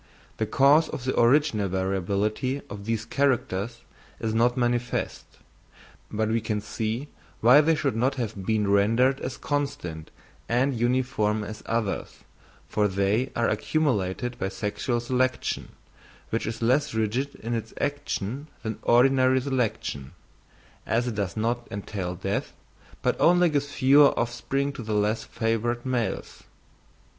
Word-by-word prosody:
The - - -1
cause 145 +4 +5
of 125 - -5
the 130 - -1
original 120 -5 +3
variability 100 +8 -1
of 100 -1 -7
these 115 0 -1
characters 120 -4 0 0.4
is 110 -1 -2
not 120 +3 +2
manifest; 120 -1 -1 0.8
but 110 0 -1
we 115 +1 +1
can 105 -1 -1
see 110 +6 -3 0.3
why 125 +6 +7
they 160 +1 +3
should 145 -6 -1
not 130 +4 +1
have 110 -6 -4
been 110 -2 +1
rendered 115 +7 +3
as 130 0 -5
constant 140 - -3 0.4
and 130 +4 +2
uniform 120 -3 0
as 110 +1 -7
others, 115 -3 -2 0.5
for 105 -1 +1
they 100 +6 0
are 115 - +2
accumulated 120 -2 0
by 95 - -1
sexual 105 +5 -2
selection, 125 +1 -1 0.6
which 115 - -1
is 110 +1 -4
less 130 +2 +2
rigid 115 +6 -1
in 115 +2 -5
its 115 -1 -3
action 145 -2 -3 0.2
than 110 -2 -4
ordinary 130 +1 +4
selection, 125 - -2 0.7
as 120 +2 0
it - - -4
does 100 -4 -3
not 120 +2 -1
entail 95 -3 -4
death, 95 +2 -3 0.5
but - - +2
only 175 0 +5
gives 145 -2 -1
fewer 140 +2 +5
offspring 135 +4 -1
to 130 - -7
the 110 -2 -2
less 105 +2 +1
favoured 115 +2 -1
males. 125 -3 -2
115 Hz, 135 wpm, -26 LUFS, 105-130 Hz, 0.8 s, why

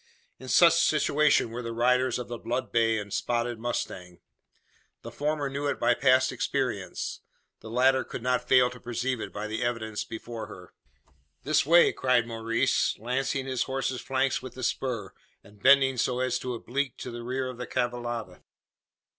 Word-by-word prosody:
In 130 - -10
such 165 +7 +6
situation 150 -4 +3
were 120 +2 -5
the 115 -1 -5
riders 125 +1 +2
of 125 - -5
the 120 -1 -6
blood 125 +2 -3
bay 115 -1 +2
and 105 -2 -6
spotted 120 -1 -1
mustang. 90 -6 -4 0.8
The 115 - -8
former 145 +3 -1
knew 140 +1 -3
it 140 - -2
by - - +3
past 130 0 +3
experience - - -3 0.4
the 110 - -10
latter 130 +3 +3
could 120 - -8
not 125 0 0
fail 125 -1 +5
to 125 - -11
perceive 125 +1 -2
it - - -6
by 105 +1 -5
the 110 +2 -4
evidence 115 -3 -2
before 115 -1 -7
her. 95 -4 -12 0.7
"This - - +2
way!" 170 +2 +6
cried 125 -2 +2
Maurice, 115 0 0
lancing 130 +3 -2
his 130 -2 -1
horse's 130 -1 -2
flanks 135 0 0
with 130 -2 -9
the 130 - -7
spur, 120 -4 -2 0.3
and 105 0 -19
bending 135 0 +5
so 125 +1 0
as 125 -1 0
to 125 -1 -4
oblique 130 +4 -3
to 125 - -6
the 120 0 -7
rear 130 +2 -2
of 125 -1 -7
the 125 - -5
cavallada. 120 -2 -3
125 Hz, 175 wpm, -27 LUFS, 115-130 Hz, 0.8 s, such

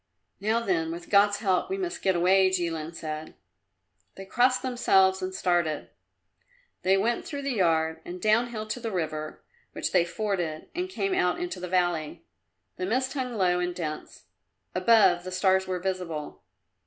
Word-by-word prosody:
"Now 220 +4 +1
then; 170 -7 0
with 170 +1 -8
God's 205 0 +5
help 190 - +1
we 385 - -2
must 360 -2 -4
get 190 -1 +2
away," 185 +2 +4
Jilin 165 -3 -2
said. 155 -1 -6 0.8
They 195 - -9
crossed 250 +5 +2
themselves 190 -7 +3
and 185 0 -3
started. 175 -4 0 0.9
They 190 +1 +3
went 230 +4 0
through 285 -2 -6
the 275 - -1
yard 165 -7 +1
and 180 +1 -7
downhill 220 +2 +1
to 215 +3 -4
the 230 -1 -4
river 155 -5 -4 0.3
which - - -2
they 180 -2 +4
forded 175 -4 -3
and 360 +1 -3
came 385 +1 -1
out 180 - +1
into 355 - -4
the 180 0 -6
valley. 175 -4 -1 0.5
The 185 - -2
mist 260 +5 0
hung 255 -4 -3
low 180 -3 +2
and 175 0 -2
dense; 155 - -6 0.5
above, 185 -2 +4
the 185 - -6
stars 190 0 +2
were 185 -1 -1
visible. 175 - -4
185 Hz, 165 wpm, -27 LUFS, 175-220 Hz, 0.9 s, God's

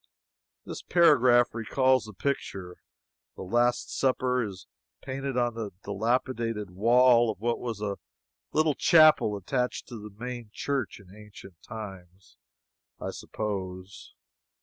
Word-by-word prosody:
This - - -7
paragraph 130 -8 +4
recalls 130 +2 +2
the 110 - -10
picture. 95 -8 -4 0.6
"The - - -7
Last 120 +5 0
Supper" 130 -1 +1
is 100 -5 -6 0.4
painted 135 -1 -4
on 120 -1 +1
the 110 -2 -4
dilapidated 115 0 -1
wall 120 +4 +4
of 105 -4 -4
what 120 +2 -1
was 115 -4 -5
a 100 -2 -3 0.5
little 155 0 +2
chapel 155 -10 +5
attached 125 +6 -2
to 120 -3 -7
the 105 +1 -9
main 120 +2 -7
church 135 -2 -3
in 95 -1 -16
ancient 105 -4 -14
times, 95 - -10 0.6
I - - -4
suppose. 95 -2 -6
115 Hz, 125 wpm, -28 LUFS, 100-125 Hz, 0.6 s, chapel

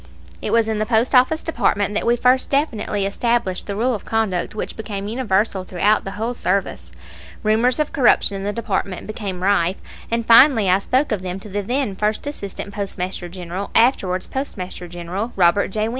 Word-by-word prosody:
It - - -3
was 230 -1 +3
in 220 -1 -1
the 215 - -1
Post 230 +1 +2
Office 260 +5 +4
Department 205 -10 0
that 215 - -1
we 240 - +4
first 250 +2 +2
definitely 220 -8 0
established 230 -1 -1
the 200 - -3
rule 245 +5 +1
of 215 - -5
conduct 215 -5 -1
which - - -4
became 205 -3 -5
universal 210 -4 0
throughout 195 +4 +1
the 195 - -4
whole 230 +3 -2
service. 200 -4 -2 0.5
Rumors 225 +4 +2
of 305 -1 -1
corruption 245 -7 +3
in 195 - -5
the 205 - -1
department 200 -4 -3
became 200 -4 -5
rife, 190 -2 +2 0.3
and 230 0 -1
finally 230 -4 +6
I 185 - +4
spoke 260 +7 0
of 210 -4 -1
them 185 0 -5
to 210 - -10
the 205 +1 -2
then 245 0 -1
First 210 +5 -1
Assistant 200 -7 -6
Postmaster 185 -3 -4
General, 180 +2 -6
afterwards 195 -7 +3
Postmaster 185 -9 -5
General, 175 +6 -5
Robert 180 +2 +3
J. 215 +3 -2
210 Hz, 185 wpm, -21 LUFS, 190-235 Hz, 0.5 s, finally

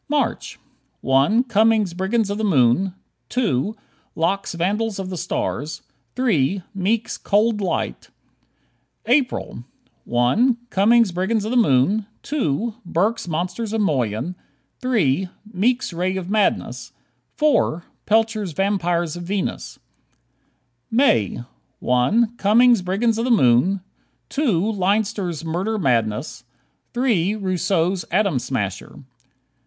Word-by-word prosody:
March: 295 0 -1 0.4
1 140 - +3
Cummings' 220 -5 +2
"Brigands 200 +4 0
of 205 - -3
the - - -2
Moon"; 175 - +2 0.3
2 215 - 0 0.4
Locke's 195 +5 -1
"Vandals 205 +5 -1
of 190 -1 -5
the - - -4
Stars"; 150 -1 -3 0.3
3 195 - +1
Meek's 215 +4 -1
"Cold 210 +1 +1
Light." 165 - -3 1.0
April: 250 - 0 0.4
1 215 - +2
Cummings' 225 +1 +4
"Brigands 195 +5 -1
of 220 - -3
the - - -1
Moon"; 205 - +3 0.2
2 235 - -1
Burk's 195 +5 -1
"Monsters 180 +7 -3
of 220 - 0
Moyen"; 130 - -1 0.5
3 190 - +1 0.2
Meek's 235 +2 0
"Ray 185 +2 -1
of 185 0 -5
Madness"; 215 -1 0 0.4
4 290 - +2 0.2
Pelcher's 215 -4 +1
"Vampires 175 -3 0
of 175 - -6
Venus." 190 +2 -3 1.1
May: 225 - +2 0.3
1 215 - +1
Cummings' 235 +2 +4
"Brigands 215 +5 0
of 230 - 0
the - - -1
Moon"; 185 - +3 0.5
2 220 - +1
Leinster's 195 -4 -1
"Murder 185 +7 -2
Madness"; 125 - -1 0.5
3 215 -6 +1
Rousseau's 185 -2 0
"Atom 190 -6 +1
Smasher." 105 -7 -4
195 Hz, 110 wpm, -21 LUFS, 170-225 Hz, 1.1 s, Cummings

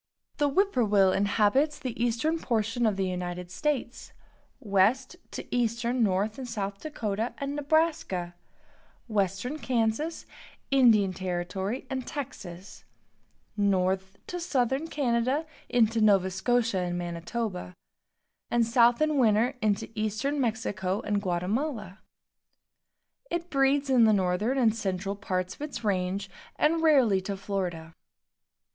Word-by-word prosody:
The 290 -1 +2
whippoorwill 235 - +3
inhabits 215 +10 +2
the 250 -5 -4
eastern 245 +8 0
portion 225 -1 0
of 210 - +1
the 195 - 0
United 180 -1 -4
States, 265 +1 -3 0.5
west 215 - +2
to - - -6
eastern 240 +1 0
North 210 +2 +1
and 260 - -5
South 200 -3 -4
Dakota 225 -6 -3
and 280 0 -3
Nebraska, 295 - 0 0.7
western 215 - -1
Kansas, 250 +6 -1 0.5
Indian 225 -8 +5
Territory 190 +6 -3
and 260 -2 -4
Texas; 195 - -7 0.7
north 190 -1 0
to 355 - -5
southern 275 -3 0
Canada, 265 +1 0 0.2
into 230 -2 +3
Nova 195 -3 +4
Scotia 225 +1 +1
and 175 -1 -2
Manitoba; 180 +2 -4 0.7
and 240 -1 +2
south 235 +3 +4
in 305 -2 +1
winter 230 +2 +3
into 215 +1 +1
eastern 220 +7 -1
Mexico 205 -5 -1
and 205 -1 -1
Guatemala. 205 - -2 1.3
It 345 0 -3
breeds 275 +1 +2
in 255 -4 +5
the 215 - +5
northern 195 +6 +1
and 230 -4 +3
central 195 -2 -2
parts 185 -2 -2
of - - -16
its 300 -5 -5
range, 195 -1 -1 0.3
and 325 +2 +2
rarely 260 -12 +4
to 195 +1 -4
Florida. 180 -5 -4
220 Hz, 120 wpm, -28 LUFS, 195-265 Hz, 1.3 s, Indian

